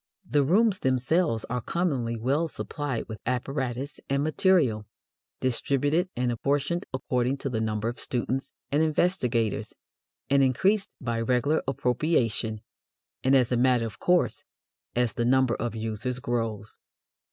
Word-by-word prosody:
The 145 +5 +3
rooms 195 +7 +3
themselves 130 0 +1
are 125 0 -2
commonly 130 -8 -1
well 140 +8 +1
supplied 145 -6 -4
with 110 -2 -7
apparatus 130 +1 -2
and 140 +1 +1
material, 150 - +2 0.5
distributed 145 +7 +1
and 125 0 0
apportioned 145 +8 -1
according 130 0 0
to 135 -1 -4
the 110 -2 -1
number 110 0 -1
of 120 - -4
students 130 +2 -2 0.2
and 145 +2 +3
investigators, 140 - 0 0.5
and 140 0 +4
increased 190 - +2
by 115 -3 -2
regular 125 +6 +2
appropriation, 120 -5 0 0.6
and 130 +1 +4
as 125 -2 +3
a 125 - +2
matter 125 -1 +3
of 110 -1 -7
course, 180 0 +2 0.5
as 120 -2 +1
the 120 - -1
number 130 0 +3
of 120 -1 -3
users 110 +3 -3
grows. 115 -4 -3
130 Hz, 135 wpm, -27 LUFS, 115-145 Hz, 0.6 s, and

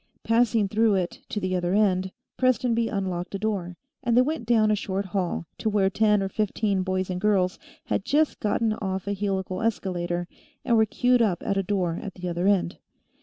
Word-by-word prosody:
Passing 230 -2 +2
through 215 +1 +2
it 180 -2 -2
to 210 - -2
the 185 -2 -1
other 180 +1 0
end, 190 -3 +2 0.2
Prestonby 240 -2 +2
unlocked 190 -2 -3
a - - 0
door, 190 -4 -3 0.2
and 235 0 +1
they 250 - +7
went 285 -5 -3
down 220 -2 +4
a - - +3
short 195 -1 -3
hall, 180 -3 -2
to 220 - 0
where 200 -2 +2
ten 210 0 +3
or - - -1
fifteen 205 -1 0
boys 185 0 -1
and 180 0 -3
girls 190 -3 +2 0.3
had - - -1
just 300 +6 +1
gotten 215 +1 +1
off 190 -3 -3
a 200 - -1
helical 190 -1 -2
escalator 175 -5 -1 0.4
and 235 - +3
were 220 -1 +4
queued 245 +3 +2
up 190 -7 +1
at 200 - 0
a 195 - +2
door 180 -3 -1
at 195 - -7
the 180 -1 -6
other 175 +2 -1
end. 195 -3 +1
200 Hz, 200 wpm, -25 LUFS, 185-220 Hz, 0.4 s, they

